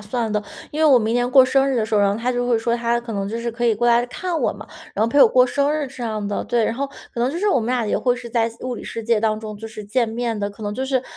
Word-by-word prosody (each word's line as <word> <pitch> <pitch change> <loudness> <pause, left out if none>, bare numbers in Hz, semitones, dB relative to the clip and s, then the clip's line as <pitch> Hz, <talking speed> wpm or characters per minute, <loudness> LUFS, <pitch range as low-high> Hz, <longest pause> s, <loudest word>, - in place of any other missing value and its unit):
算 220 +1 -3
的， 210 0 0 0.3
因 305 - -4
为 - - +4
我 255 - +7
明 220 0 -1
年 245 +1 +1
过 260 0 +7
生 270 +1 +2
日 265 - 0
的 220 - +1
时 220 0 -2
候， 205 - +4
然 200 -1 +3
后 205 - -2
他 250 +2 -1
就 245 0 -1
会 235 -2 +3
说， 235 +1 0
他 235 0 0
可 235 -1 -7
能 200 -1 -2
就 230 +2 -4
是 235 0 -3
可 235 +1 -2
以 225 - +3
过 240 +3 0
来 240 0 +4
看 345 +5 -3
我 - - +2
嘛， - - -11 0.3
然 215 - +1
后 - - +1
陪 285 - +4
我 - - +7
过 250 0 +4
生 280 +3 +1
日 300 -2 -1
这 260 -1 -9
样 215 -3 -3
的 205 - -2
对， 235 -2 +1
然 - - 0
后 280 +2 -2 0.3
可 235 - -4
能 250 +2 +1
就 335 - -4
是 415 +2 +1
我 260 - +3
们 220 - -3
俩 245 -2 0
也 - - 0
会 245 -1 +1
是 240 - -8
在 230 -1 +1
现 230 - -15
物 250 - -2
理 - - -8
世 230 - -6
界 225 -1 +1
当 215 -1 +1
中， 215 -1 -7
就 225 +1 -7
是 215 -1 -9
见 230 +2 0
面 230 -1 -2
的。 200 0 -1
可 205 +2 -12
能 205 0 -3
就 260 +5 -3
是 260 -2 0
235 Hz, 380 characters per minute, -21 LUFS, 220-250 Hz, 0.3 s, 我